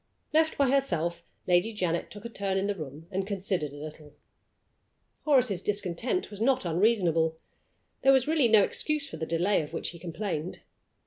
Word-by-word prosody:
Left 315 0 +3
by 275 -2 +3
herself, 170 - 0 0.2
Lady 180 +5 +3
Janet 175 -5 -1
took 205 +1 -9
a - - -4
turn 195 -4 -2
in 195 - 0
the 205 - 0
room, 155 -3 -8
and 190 0 -2
considered 190 -7 -1
a 145 - -10
little. 150 0 -10 1.1
Horace's 250 - +3
discontent 210 - -2
was 205 0 -8
not 260 -2 +2
unreasonable. 170 -3 +2 0.6
There 270 - +6
was 265 -1 +4
really 305 -5 +3
no 215 -3 +6
excuse 305 +5 0
for 160 - -8
the 160 0 -4
delay 175 +4 +2
of 150 - -8
which - - -2
he 170 - -10
complained. 175 -1 -4
195 Hz, 175 wpm, -28 LUFS, 165-230 Hz, 1.1 s, There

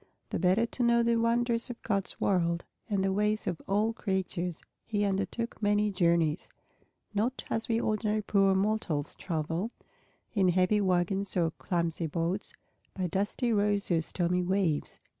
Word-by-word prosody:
The - - -1
better 190 +5 +3
to 240 - -5
know 235 0 +4
the 235 0 +3
wonders 235 +1 +1
of 245 - -6
God's 200 -3 -1
world 170 -3 +1 0.2
and 200 -2 +1
the 195 0 +1
ways 210 +2 +1
of 180 -5 -3
all 210 +3 +2
creatures, 185 -5 -2 0.2
he 205 -2 -1
undertook 205 +4 -2
many 205 0 +2
journeys, 170 -3 +1 0.6
not 230 +6 -1
as 225 - -1
we 225 0 +2
ordinary 215 -1 0
poor 195 -1 +3
mortals 190 -7 0
travel, 165 +4 -2 0.6
in 195 -4 +3
heavy 185 +4 +3
wagons 190 +1 0
or 165 -2 +2
clumsy 170 -2 -2
boats, 170 +5 -2 0.4
by 185 - -1
dusty 205 +7 0
roads 205 -2 +1
or 165 -1 +3
stormy 180 +2 0
waves. 180 -4 0
195 Hz, 150 wpm, -30 LUFS, 175-215 Hz, 0.6 s, know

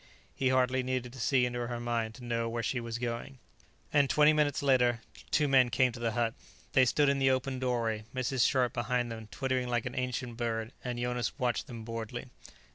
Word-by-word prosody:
He 130 - +1
hardly 130 0 +2
needed 125 -1 -3
to 130 - -10
see 125 +1 +3
into 120 -1 -2
her 120 -1 -4
mind 115 -2 -2
to 125 - -12
know 115 -1 -1
where 115 0 -3
she 125 +3 -1
was 115 -1 -4
going. 120 +2 -4 0.6
And 140 -2 +4
twenty 150 0 +5
minutes 145 -2 +1
later 125 -4 +3 0.3
two 150 -1 +2
men 130 -3 +5
came 130 +1 +3
to 120 - -9
the 115 -2 -1
hut. 115 -1 0 0.4
They 130 - +6
stood 145 +4 +3
in 140 0 +2
the 135 0 +4
opened 130 0 0
doorway, 115 -4 -1
Mrs. 130 0 -2
Scharpe 125 -2 +2
behind 120 0 -1
them 110 -1 -7
twittering 130 0 -1
like 120 -2 0
an 125 - -4
ancient 125 -2 -3
bird, 115 -1 -2
and 125 -1 -3
Jonas 120 -1 -2
watched 125 -3 -1
them 115 -2 -7
boredly. 115 -1 -5
125 Hz, 205 wpm, -31 LUFS, 115-130 Hz, 0.6 s, They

